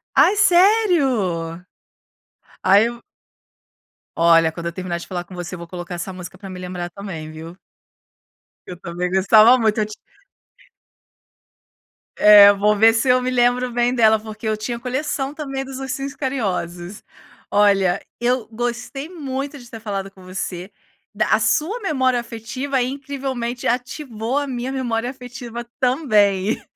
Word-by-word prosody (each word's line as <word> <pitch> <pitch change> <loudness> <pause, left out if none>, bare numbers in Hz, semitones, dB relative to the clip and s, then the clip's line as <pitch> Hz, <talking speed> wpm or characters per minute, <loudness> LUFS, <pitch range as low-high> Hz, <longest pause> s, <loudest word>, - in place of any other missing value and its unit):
Ai 410 - +5
sério? 280 - +2 1.0
Ai 200 +4 +5 1.3
Olha, 165 -1 +4
quando 170 +1 -7
eu 170 - -2
terminar 180 -2 -4
de - - -10
falar 175 -2 -4
com 185 - -13
você, 180 +1 -6
eu - - -7
vou 170 - -8
colocar 175 0 -7
essa 175 +2 -5
música, 180 0 -9
para 195 +1 -10
me 185 - -8
lembrar 180 -1 -5
também 170 -5 -7
viu? 165 +2 -10 1.1
Eu 180 - -8
também 175 +1 -4
gostava 215 +6 +6
muito, 220 -2 +1
eu 210 - +1
ti 215 - -10 2.2
É, 205 -1 +9
vou 210 +1 +2
ver 225 +2 +6
se 230 +3 0
eu 250 0 +4
me 255 - -1
lembro 245 0 +2
bem 240 +1 +1
dela, 220 -2 +4
porque 220 0 -9
eu 215 0 0
tinha 235 +3 -4
coleção 270 +2 -3
também, 275 -3 -5
dos 265 0 -8
ursinhos 270 +1 -4
carinhosos. 195 - -3 0.5
Olha, 195 -3 +3 0.2
eu 245 -1 0
gostei 245 +5 -4
muito 280 -4 -5
de 240 -2 -14
ter 225 - -9
falado 195 -3 -4
com 190 -1 -18
você, 185 0 -6 0.4
da - - 0
a - - +2
sua 380 +11 +1
memória 260 - +1
afetiva, 250 +4 -3
incrivelmente 260 -2 -4
ativou 245 -1 -2
a 285 - -2
minha 255 -1 -4
memória 240 -3 -2
afetiva 245 -2 -8
também. 215 -7 +2
225 Hz, 145 wpm, -21 LUFS, 190-260 Hz, 2.2 s, É